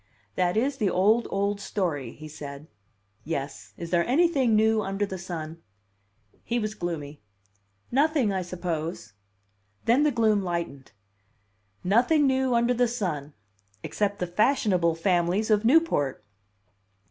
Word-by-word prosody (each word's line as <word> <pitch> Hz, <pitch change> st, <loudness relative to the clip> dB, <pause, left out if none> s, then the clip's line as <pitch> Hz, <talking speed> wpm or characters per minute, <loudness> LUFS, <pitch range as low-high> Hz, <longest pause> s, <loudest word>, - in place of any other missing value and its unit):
"That 180 Hz, +1 st, 0 dB
is 270 Hz, +4 st, +1 dB
the 210 Hz, -6 st, +1 dB
old, 215 Hz, +6 st, +3 dB
old 200 Hz, +1 st, -1 dB
story," 155 Hz, -, -2 dB
he 155 Hz, -, -10 dB
said. 145 Hz, -1 st, -9 dB, 0.6 s
"Yes; 140 Hz, -3 st, -5 dB
is 170 Hz, -1 st, -7 dB
there 170 Hz, -1 st, +3 dB
anything 270 Hz, -4 st, +3 dB
new 220 Hz, 0 st, +3 dB
under 195 Hz, 0 st, -1 dB
the 190 Hz, -2 st, -6 dB
sun?" 165 Hz, -2 st, -6 dB, 0.8 s
He 240 Hz, -, -1 dB
was 215 Hz, -2 st, -2 dB
gloomy. 155 Hz, -6 st, -5 dB, 0.7 s
"Nothing, 280 Hz, -5 st, +2 dB
I 190 Hz, -, -1 dB
suppose." 170 Hz, -, -4 dB, 0.7 s
Then 240 Hz, +5 st, +4 dB
the 300 Hz, -, +4 dB
gloom 220 Hz, -5 st, +2 dB
lightened. 170 Hz, -8 st, -4 dB, 0.9 s
"Nothing 250 Hz, -, +3 dB
new 265 Hz, -2 st, +2 dB
under 235 Hz, +1 st, +3 dB
the 245 Hz, 0 st, +2 dB
sun 165 Hz, -, -3 dB, 0.5 s
except 205 Hz, -1 st, -1 dB
the 180 Hz, -, -2 dB
fashionable 185 Hz, -, +2 dB
families 180 Hz, +5 st, +1 dB
of 210 Hz, +1 st, +3 dB
Newport!" 235 Hz, -, +2 dB
195 Hz, 130 wpm, -26 LUFS, 170-235 Hz, 0.9 s, Then